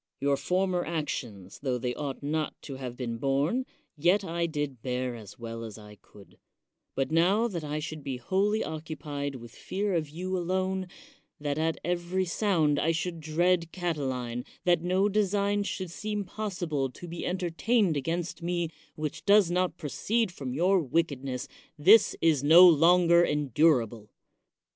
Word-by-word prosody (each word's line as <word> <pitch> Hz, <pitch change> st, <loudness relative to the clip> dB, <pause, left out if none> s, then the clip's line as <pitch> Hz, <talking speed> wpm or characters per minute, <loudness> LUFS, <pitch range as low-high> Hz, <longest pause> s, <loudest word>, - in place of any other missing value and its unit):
Your 140 Hz, +1 st, +2 dB
former 180 Hz, +5 st, 0 dB
actions, 120 Hz, -, -4 dB
tho 130 Hz, -3 st, -1 dB
they 125 Hz, +1 st, -2 dB
ought 140 Hz, 0 st, -5 dB
not 155 Hz, +1 st, -2 dB
to 135 Hz, -2 st, -7 dB
have 125 Hz, -2 st, -6 dB
been 115 Hz, -3 st, -3 dB
borne, 140 Hz, -, 0 dB, 0.3 s
yet 175 Hz, +7 st, +3 dB
I 170 Hz, -1 st, -1 dB
did 145 Hz, -6 st, -4 dB
bear 125 Hz, 0 st, -2 dB
as 105 Hz, -5 st, -11 dB
well 115 Hz, -1 st, -6 dB
as 110 Hz, -2 st, -8 dB
I 105 Hz, -1 st, -12 dB
could; 100 Hz, -2 st, -18 dB, 0.6 s
but 135 Hz, +2 st, -1 dB
now 190 Hz, +8 st, +3 dB
that 175 Hz, -8 st, -5 dB
I 150 Hz, 0 st, -3 dB
should 155 Hz, -1 st, -5 dB
be 135 Hz, -2 st, -3 dB
wholly 195 Hz, -, +1 dB
occupied 150 Hz, -3 st, -5 dB
with 120 Hz, -2 st, -10 dB
fear 200 Hz, -, -3 dB
of 160 Hz, -4 st, -1 dB
you 185 Hz, +5 st, -4 dB
alone, 185 Hz, +1 st, -1 dB, 0.5 s
that 145 Hz, 0 st, -2 dB
at 160 Hz, 0 st, 0 dB
every 175 Hz, +2 st, -1 dB
sound 170 Hz, -6 st, +1 dB
I 165 Hz, -, +2 dB
should 170 Hz, +1 st, -3 dB
dread 165 Hz, +2 st, +1 dB
Cati 175 Hz, -4 st, -2 dB
line, 125 Hz, -1 st, -4 dB, 0.2 s
that 175 Hz, -2 st, +3 dB
no 185 Hz, +3 st, +2 dB
design 205 Hz, 0 st, +1 dB
should 185 Hz, -3 st, -4 dB
seem 210 Hz, +2 st, -3 dB
possible 175 Hz, -10 st, -3 dB
to 175 Hz, +7 st, -11 dB
be 170 Hz, 0 st, -6 dB
•entertained 185 Hz, +2 st, +1 dB
against 165 Hz, +5 st, -3 dB
me 175 Hz, -1 st, -1 dB, 0.2 s
which 155 Hz, +1 st, -4 dB
does 200 Hz, -3 st, +5 dB
not 180 Hz, -1 st, 0 dB
proceed 210 Hz, -, -1 dB
from 135 Hz, -7 st, -6 dB
your 180 Hz, +8 st, +3 dB
wickedness, 140 Hz, -4 st, -1 dB, 0.3 s
this 195 Hz, +9 st, +6 dB
is 155 Hz, -5 st, +3 dB
no 170 Hz, +5 st, +9 dB
longer 170 Hz, +1 st, +6 dB
endura 150 Hz, -4 st, +3 dB
ble. 105 Hz, -1 st, -13 dB
165 Hz, 160 wpm, -28 LUFS, 140-180 Hz, 0.6 s, no